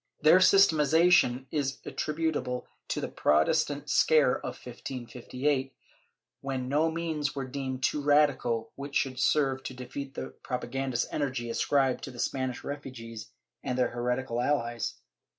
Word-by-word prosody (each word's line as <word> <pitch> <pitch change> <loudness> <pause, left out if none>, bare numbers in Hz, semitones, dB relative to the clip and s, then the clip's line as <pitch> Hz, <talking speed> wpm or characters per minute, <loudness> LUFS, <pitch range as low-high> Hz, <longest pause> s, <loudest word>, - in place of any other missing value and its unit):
Their 155 +4 +7
systematiza 170 -3 +5
tion 130 -7 +4
is 140 -3 -1
attributable 150 -5 -2 0.2
to - - -2
the - - -2
Protestant 140 - +1
scare 150 -1 +4
of - - -6
1558, 130 +2 -3 0.7
when 130 -2 -3
no 150 +4 +2
means 160 -3 -2
were 135 -1 -3
deemed 130 0 -4
too 150 - +1
radical 145 -6 +2
which 140 +1 -7
should 130 -2 0
serve 135 -1 +2
to 130 - -7
defeat 135 +2 -7
the 65 0 -6
propa 120 - -4
gandist 130 -2 -1
energy 130 -5 -2
ascribed 135 +1 +1
to - - -7
the 125 - -11
Spanish 130 0 -2
refugees 115 -6 -7 0.3
and 125 - -3
their 125 - +2
heretical 120 0 -2
allies. 120 -4 -1
135 Hz, 140 wpm, -29 LUFS, 125-145 Hz, 0.7 s, Their